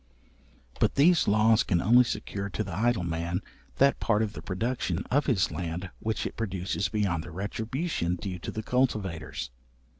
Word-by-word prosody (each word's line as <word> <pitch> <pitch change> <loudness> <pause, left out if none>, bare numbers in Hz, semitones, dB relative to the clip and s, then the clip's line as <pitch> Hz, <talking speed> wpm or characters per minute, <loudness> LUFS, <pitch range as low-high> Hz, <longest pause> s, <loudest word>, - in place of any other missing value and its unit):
But - - +2
these 165 +4 +5
laws 110 +2 +5
can 90 -8 +1
only 120 +7 +6
secure 100 -3 -4
to 110 - -2
the 95 -4 -6
idle 115 -2 +1
man, 85 +2 -2 0.3
that 140 0 +4
part 110 -1 +2
of 105 -2 -3
the - - -7
production 115 +7 -2
of 145 +3 +2
his 105 -9 +2
land 90 +1 -4
which 110 0 -2
it - - -4
produces 95 -4 -2
beyond 95 -6 0
the 85 - -9
retribution 105 - -2
due 90 -1 -5
to - - -6
the 110 - -4
cultivators. 95 - -1
100 Hz, 170 wpm, -28 LUFS, 90-115 Hz, 0.3 s, only